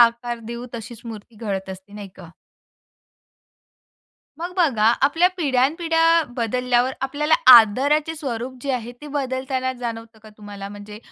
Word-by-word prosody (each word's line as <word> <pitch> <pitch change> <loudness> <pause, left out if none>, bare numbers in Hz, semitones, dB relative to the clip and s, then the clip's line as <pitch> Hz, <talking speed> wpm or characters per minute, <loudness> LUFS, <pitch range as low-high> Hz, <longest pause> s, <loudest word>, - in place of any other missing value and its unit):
आकार 235 0 +3
देऊ 235 +1 -6
तशीच 230 0 -8
मूर्ती 225 0 -10
घडत 195 -3 -4
असते, 190 +2 -11
नाही 205 -1 -8
का? 175 -4 -12 2.1
मग 350 +2 -5
बघा, 255 -12 +2 0.2
आपल्या 330 +6 +4
पिढ्यानपिढ्या 325 +3 +2
बदलल्यावर 250 +2 0
आपल्याला 300 +3 +1 0.2
आदराचे 280 +8 +5
स्वरूप 255 -3 -5
जे 275 - -2
आहे 240 -1 -4
ते 295 - -10
बदलताना 260 -1 -2
जाणवतं 230 -2 -7
का 220 - -13
तुम्हाला? 205 -2 -9
म्हणजे 205 +1 -10
245 Hz, 130 wpm, -22 LUFS, 220-280 Hz, 2.1 s, आदराचे